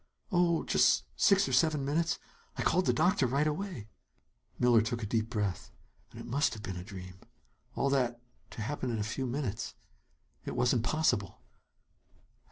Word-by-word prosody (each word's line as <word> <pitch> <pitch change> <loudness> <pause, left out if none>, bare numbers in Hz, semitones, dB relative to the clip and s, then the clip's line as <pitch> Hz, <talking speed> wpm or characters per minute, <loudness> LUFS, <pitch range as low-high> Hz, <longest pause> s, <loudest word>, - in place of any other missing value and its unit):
"Oh, 175 -3 +2
just - - +3
six 195 - +4
or 130 - -3
seven 150 +1 +3
minutes. 160 +3 0 0.4
I - - -1
called 180 +2 +2
the - - +5
doctor 175 -7 +2
right 140 +5 +1
away." 155 - -3 0.7
Miller 120 -2 +5
took 115 +1 -3
a - - -1
deep 110 +1 -1
breath. 105 -5 -2 0.4
Then - - -12
it - - -10
must 140 -2 +1
have 110 - -10
been 95 -4 -4
a 90 - -6
dream. 95 -2 -10 0.6
All 140 - +1
that 125 -3 +1 0.3
to 110 - -6
happen 130 +1 -3
in 115 - -1
a 105 - -1
few 130 +5 -3
minutes 125 -4 -3 0.7
It - - -5
wasn't 120 -1 +2
possible! 125 - 0
125 Hz, 170 wpm, -31 LUFS, 110-150 Hz, 0.7 s, the